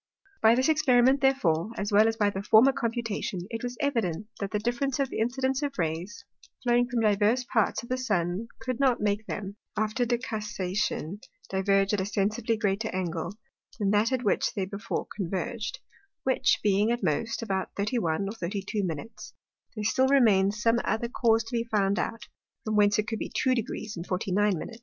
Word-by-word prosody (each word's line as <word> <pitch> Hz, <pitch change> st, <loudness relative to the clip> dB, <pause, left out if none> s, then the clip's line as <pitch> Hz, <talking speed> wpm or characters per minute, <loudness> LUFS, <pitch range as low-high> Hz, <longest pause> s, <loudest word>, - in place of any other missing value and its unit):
By 225 Hz, +1 st, +6 dB
this 260 Hz, +2 st, +2 dB
Experiment 270 Hz, -4 st, +4 dB
therefore, 210 Hz, -, +2 dB
as 205 Hz, +1 st, -2 dB
well 210 Hz, +2 st, +6 dB
as 225 Hz, 0 st, -1 dB
by 205 Hz, -2 st, +2 dB
the 195 Hz, -, -4 dB
former 220 Hz, +6 st, +6 dB
Computation, 230 Hz, -6 st, -2 dB
it 230 Hz, 0 st, -4 dB
was 245 Hz, 0 st, -5 dB
evident, 225 Hz, -, -1 dB
that 200 Hz, -, -2 dB
the 210 Hz, -, -1 dB
difference 240 Hz, +5 st, -1 dB
of 275 Hz, -2 st, 0 dB
the -, -, -3 dB
Incidence 260 Hz, +4 st, 0 dB
of 285 Hz, -1 st, -3 dB
Rays, 170 Hz, +4 st, -3 dB, 0.4 s
flowing 245 Hz, 0 st, +3 dB
from 240 Hz, -2 st, 0 dB
divers 215 Hz, +4 st, +2 dB
parts 225 Hz, 0 st, +2 dB
of 235 Hz, -, -11 dB
the 255 Hz, 0 st, -1 dB
Sun 195 Hz, -3 st, -1 dB
could 255 Hz, -1 st, -4 dB
not 265 Hz, -3 st, +3 dB
make 210 Hz, +1 st, -1 dB
them, 200 Hz, 0 st, -5 dB, 0.2 s
after 215 Hz, +3 st, 0 dB
decussation, 210 Hz, -6 st, -2 dB, 0.3 s
diverge 195 Hz, +1 st, +2 dB
at 205 Hz, -, +1 dB
a 190 Hz, -, -2 dB
sensibly 215 Hz, +3 st, 0 dB
greater 210 Hz, +1 st, 0 dB
Angle, 175 Hz, 0 st, -3 dB, 0.4 s
than 200 Hz, -3 st, +1 dB
that 210 Hz, +3 st, +3 dB
at 255 Hz, -1 st, 0 dB
which 210 Hz, -, +1 dB
they 195 Hz, -3 st, -1 dB
before 200 Hz, +4 st, -4 dB
converged; 215 Hz, -, -3 dB, 0.5 s
which 260 Hz, -1 st, +2 dB
being, 205 Hz, +1 st, +3 dB
at 240 Hz, -2 st, -2 dB
most, 205 Hz, +10 st, -1 dB
but -, -, -4 dB
about 190 Hz, -3 st, -3 dB
thirty 210 Hz, +5 st, 0 dB
one 170 Hz, +1 st, -1 dB
or -, -, -3 dB
thirty 195 Hz, -2 st, -4 dB
two 210 Hz, -1 st, -1 dB
Minutes, 180 Hz, +6 st, -6 dB, 0.4 s
there 215 Hz, -, -4 dB
still 260 Hz, +5 st, +3 dB
remain'd 210 Hz, -8 st, +4 dB
some 230 Hz, +2 st, +2 dB
other 225 Hz, +3 st, -1 dB
cause 230 Hz, -2 st, +2 dB
to 225 Hz, +2 st, -6 dB
be 230 Hz, -, +1 dB
found 200 Hz, -3 st, +1 dB
out, 225 Hz, +2 st, -3 dB, 0.4 s
from 215 Hz, -1 st, -1 dB
whence 205 Hz, 0 st, +4 dB
it 215 Hz, +1 st, 0 dB
could 225 Hz, -2 st, -3 dB
be -, -, -4 dB
two 260 Hz, -, +1 dB
Deg. 235 Hz, -1 st, -1 dB, 0.4 s
49 195 Hz, +1 st, +1 dB
Min. 160 Hz, -, -6 dB
215 Hz, 190 wpm, -28 LUFS, 195-240 Hz, 0.5 s, By